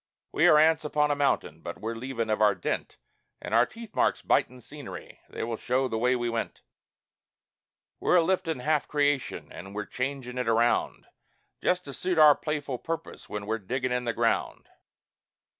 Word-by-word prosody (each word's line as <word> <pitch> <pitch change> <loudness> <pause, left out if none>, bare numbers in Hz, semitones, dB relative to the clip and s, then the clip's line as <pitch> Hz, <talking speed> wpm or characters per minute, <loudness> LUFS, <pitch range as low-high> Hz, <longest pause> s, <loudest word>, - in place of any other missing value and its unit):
We - - +4
are 150 - +7
ants 160 0 +4
upon 150 0 +1
a - - +2
mountain, 145 -1 0
but - - -7
we're 115 +1 -3
leavin' 115 -1 -3
of 110 - 0
our 105 -1 +5
dent, - - -3 0.4
An' - - -7
our 115 +2 +5
teeth 230 -2 -11
marks - - +1
bitin' 125 0 +1
scenery 145 +3 -10
they - - -5
will 115 0 -3
show 130 +3 0
the 110 -3 -2
way 125 +2 +3
we 120 -1 -1
went; 115 -1 -3 1.4
We're - - +2
a 170 - +5
liftin' 165 -6 0
half 150 +2 +1
creation, 145 -2 0
an' 95 +2 -9
we're 105 0 -4
changin' 125 +1 -4
it 125 - -2
around, 115 +1 +1 0.6
Just 180 0 +1
to 140 - -7
suit 180 +3 -2
our 155 -2 +9
playful 145 -4 -4
purpose 165 0 -6
when 105 -1 -5
we're 110 +2 -2
diggin' 125 +5 -2
in 125 0 -1
the 115 - 0
ground. - - -1
130 Hz, 180 wpm, -27 LUFS, 115-150 Hz, 1.4 s, our